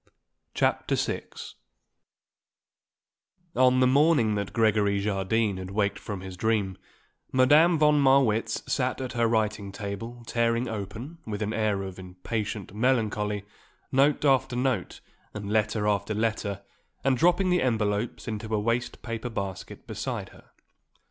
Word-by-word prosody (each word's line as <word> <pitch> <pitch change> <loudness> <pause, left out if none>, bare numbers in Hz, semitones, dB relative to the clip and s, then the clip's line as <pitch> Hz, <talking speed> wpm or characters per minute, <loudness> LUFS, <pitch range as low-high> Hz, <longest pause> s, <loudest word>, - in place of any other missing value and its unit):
CHAPTER - - +1
VI - - -2 2.3
On 130 0 +4
the - - +6
morning 140 -4 +4
that 100 -2 -2
Gregory 105 -2 +2
Jardine 100 +1 0
had 95 0 -6
waked 100 0 0
from 100 -3 -6
his 95 -1 -8
dream, 100 -2 0 0.5
Madame 150 +7 +5
von 150 -1 +4
Marwitz 120 -5 +3
sat 130 -1 -1
at 130 -1 -4
her 120 -1 +2
writing 110 -3 0
table 110 +4 -6
tearing 115 +1 +1
open, 110 - -6
with 105 0 -3
an 105 +1 -2
air 105 -3 0
of 95 -1 -7
impatient 100 +3 -5
melancholy, 105 -3 0 0.5
note 140 +3 +3
after 135 -2 +3
note 125 -6 -1 0.3
and 105 -1 -5
letter 110 -1 +1
after 105 +1 0
letter, 105 -2 -1 0.4
and 135 -1 +3
dropping 175 +6 +3
the 180 - +3
envelopes 110 -2 -1
into 110 0 -4
a - - +1
waste 115 +3 -2
paper 115 +1 -4
basket 100 -4 -6
beside - - -4
her. - - -19
110 Hz, 135 wpm, -27 LUFS, 100-125 Hz, 2.3 s, the